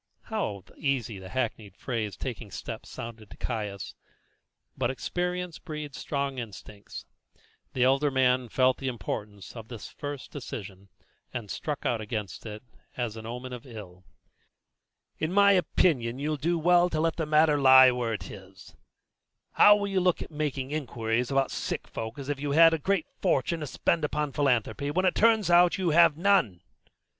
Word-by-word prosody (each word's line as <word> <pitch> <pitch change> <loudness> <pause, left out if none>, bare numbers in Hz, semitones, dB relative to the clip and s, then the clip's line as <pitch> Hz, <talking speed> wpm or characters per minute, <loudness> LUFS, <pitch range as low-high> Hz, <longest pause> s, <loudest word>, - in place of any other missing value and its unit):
How 110 - -3
easy 125 -8 -1
the 95 0 -10
hackneyed 110 -5 -3
phrase 110 -5 -3
"taking 120 -4 -6
steps" - - -7
sounded 115 -3 -8
to - - -13
Caius! 105 -5 -4 0.8
but - - 0
experience 180 +5 -3
breeds 150 -5 -7
strong 140 -2 -2
instincts. 105 -2 -9 0.7
The 125 - +1
elder 135 +3 +3
man 130 -2 +2
felt 130 +2 +3
the 135 - -4
importance 105 -3 -5
of 115 -2 -9
this 115 -3 -8
first 145 -2 -7
decision, 100 -8 -8 0.4
and 115 -5 -5
struck 150 -3 -4
out 115 -2 0
against 105 -1 -5
it 110 +2 -8 0.3
as 120 -3 -2
an 110 0 -8
omen 125 +2 -6
of 125 +2 -9
ill. 95 -6 -11 1.2
"In 160 +2 -1
my 200 +1 +6
opinion 150 -9 +2
you'll 150 +2 -1
do 165 +4 0
well 175 +2 +4
to 155 - -2
let 165 0 0
the 160 -2 -2
matter 150 -1 +4
lie 130 -1 +8
where 120 -2 -2
it 105 - -6
is. 95 -1 -13 0.8
How 205 - +7
will 205 -1 -2
you 195 -1 0
look 180 -2 0
making 145 -3 -3
inquiries 120 -5 -1
about 135 -1 +1
sick - - -4
folk 110 +2 -6
as 140 -2 -7
if 145 -1 -2
you 145 0 -2
had 165 +1 +7
a 165 - 0
great 190 +1 0 0.2
fortune 165 +6 +1
to 150 - -4
spend 165 +4 0
upon 150 -1 -1
philanthropy, 140 0 0
when 185 +6 0
it 185 - +3
turns 220 -5 +3
out 175 0 +6
that - - -1
you 180 -4 0
have 165 -1 +5
none? 170 - +2
135 Hz, 170 wpm, -28 LUFS, 115-160 Hz, 1.2 s, lie